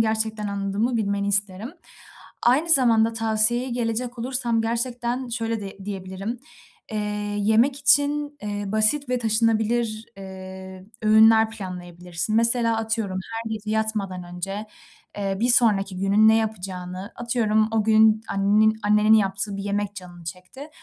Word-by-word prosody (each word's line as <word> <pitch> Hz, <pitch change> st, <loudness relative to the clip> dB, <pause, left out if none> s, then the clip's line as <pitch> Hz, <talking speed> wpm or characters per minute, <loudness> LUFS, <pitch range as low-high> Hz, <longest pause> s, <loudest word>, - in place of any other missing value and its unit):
gerçekten 220 Hz, -1 st, -1 dB
anladığımı 200 Hz, +4 st, -1 dB
bilmeni 200 Hz, -2 st, -1 dB
isterim. 200 Hz, +3 st, 0 dB, 0.7 s
Aynı 275 Hz, +8 st, +3 dB
zamanda 230 Hz, -6 st, +4 dB
tavsiyeye 225 Hz, +3 st, +1 dB
gelecek 240 Hz, +1 st, -3 dB
olursam, 240 Hz, -2 st, -1 dB
gerçekten 240 Hz, +2 st, -2 dB
şöyle 230 Hz, -1 st, -3 dB
di 195 Hz, -1 st, -8 dB
diyebilirim: 195 Hz, +3 st, -5 dB, 0.5 s
Eee, 215 Hz, -, -2 dB, 0.4 s
yemek 225 Hz, +6 st, +3 dB
için, 290 Hz, +2 st, +2 dB
eee, 205 Hz, 0 st, -4 dB
basit 220 Hz, +7 st, +2 dB
ve 250 Hz, 0 st, 0 dB
taşınabilir, 225 Hz, 0 st, 0 dB
eee, 190 Hz, 0 st, -10 dB, 0.2 s
öğünler 220 Hz, +1 st, +5 dB
planlayabilirsin. 180 Hz, -1 st, -5 dB
Mesela, 230 Hz, 0 st, +2 dB
atıyorum, 220 Hz, -4 st, -2 dB
her 225 Hz, 0 st, -5 dB
gece 215 Hz, -1 st, -5 dB
yatmadan 215 Hz, -4 st, -2 dB
önce, 195 Hz, +4 st, -6 dB, 0.5 s
eee, 195 Hz, -1 st, -2 dB
bir 240 Hz, -, +2 dB
sonraki 205 Hz, -6 st, +3 dB
günün 200 Hz, +3 st, +4 dB
ne 220 Hz, -, +5 dB
yapacağını, 190 Hz, -2 st, -4 dB
atıyorum, 220 Hz, -2 st, +1 dB
o 220 Hz, -1 st, +1 dB
gün 220 Hz, 0 st, +4 dB
annenin 210 Hz, +2 st, +2 dB
annenin 210 Hz, +1 st, +4 dB
yaptığı 195 Hz, -1 st, 0 dB
bir 195 Hz, -, -5 dB
yemek 205 Hz, 0 st, -2 dB
canın 175 Hz, -3 st, -11 dB
çekti. 185 Hz, -, -9 dB
220 Hz, 130 wpm, -23 LUFS, 195-230 Hz, 0.7 s, öğünler